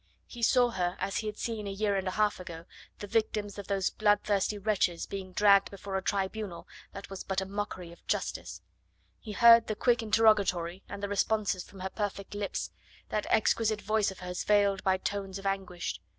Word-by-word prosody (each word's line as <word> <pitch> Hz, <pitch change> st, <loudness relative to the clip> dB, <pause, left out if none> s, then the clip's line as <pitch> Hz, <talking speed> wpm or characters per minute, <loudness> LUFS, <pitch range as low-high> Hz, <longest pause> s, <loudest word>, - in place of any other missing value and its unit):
He 240 Hz, -, -10 dB
saw 245 Hz, +1 st, +4 dB
her 180 Hz, -3 st, -1 dB
as 195 Hz, 0 st, -2 dB
he 220 Hz, -, -2 dB
had 210 Hz, 0 st, -5 dB
seen 220 Hz, -3 st, -3 dB
a -, -, -3 dB
year 200 Hz, +1 st, 0 dB
and 190 Hz, -1 st, -1 dB
a 185 Hz, -, -3 dB
half 210 Hz, -2 st, +2 dB
ago 170 Hz, -2 st, -8 dB, 0.3 s
the -, -, -6 dB
victims 210 Hz, -1 st, -1 dB
of 200 Hz, -, -7 dB
those 195 Hz, -2 st, 0 dB
bloodthirsty 205 Hz, -1 st, +1 dB
wretches 200 Hz, -4 st, 0 dB
being 190 Hz, -2 st, -6 dB
dragged 200 Hz, +1 st, +5 dB
before 200 Hz, 0 st, -7 dB
a 190 Hz, -, 0 dB
tribunal 195 Hz, -1 st, -3 dB, 0.2 s
that 200 Hz, 0 st, -9 dB
was 195 Hz, -, -6 dB
but 190 Hz, 0 st, -1 dB
a 190 Hz, -, -3 dB
mockery 195 Hz, -3 st, -5 dB
of 170 Hz, -, -16 dB
justice; -, -, -3 dB, 0.6 s
he 215 Hz, -, -8 dB
heard 230 Hz, +1 st, +7 dB
the 215 Hz, -, -2 dB
quick 240 Hz, +1 st, +2 dB
interrogatory, 205 Hz, -5 st, +2 dB
and 200 Hz, 0 st, -7 dB
the -, -, 0 dB
responses 200 Hz, -1 st, 0 dB
from 195 Hz, -, -13 dB
her 190 Hz, -, -3 dB
perfect 205 Hz, -2 st, -4 dB
lips, 205 Hz, -1 st, -3 dB, 0.4 s
that 210 Hz, -, -2 dB
exquisite 215 Hz, -1 st, +2 dB
voice 215 Hz, 0 st, +2 dB
of 190 Hz, -1 st, -10 dB
hers 180 Hz, 0 st, -4 dB
veiled 200 Hz, -2 st, +3 dB
by 190 Hz, -1 st, +3 dB
tones 195 Hz, 0 st, -3 dB
of 195 Hz, -, -10 dB
anguish. 180 Hz, -, -3 dB
200 Hz, 195 wpm, -30 LUFS, 190-215 Hz, 0.6 s, heard